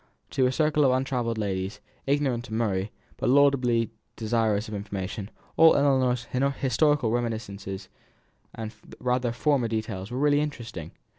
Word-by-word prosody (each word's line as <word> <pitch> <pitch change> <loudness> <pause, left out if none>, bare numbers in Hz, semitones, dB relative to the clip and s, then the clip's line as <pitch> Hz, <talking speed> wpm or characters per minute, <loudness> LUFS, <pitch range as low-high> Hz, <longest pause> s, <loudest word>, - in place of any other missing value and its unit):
To 130 - +2
her 125 - +3
circle 150 +1 +2
of 135 - +5
untravelled 125 -3 -1
ladies, 100 +1 -2 0.3
ignorant 135 -4 +1
of 110 - -5
Murray, 105 -3 0 0.3
but 130 - 0
laudably 125 -4 +3 0.2
desirous 110 -2 0
of 110 - -7
information, 100 0 -4 0.3
all 160 0 +8
Ellinor's 130 -4 +2 0.3
historical 140 -1 +2
reminiscences 110 -5 -3 0.7
and 110 0 -6 0.3
rather 125 -1 0
formal 125 -1 +1
details 110 -3 -3
were 125 - -4
really 145 +1 +3
interesting. 120 - -5
120 Hz, 135 wpm, -27 LUFS, 110-135 Hz, 0.7 s, all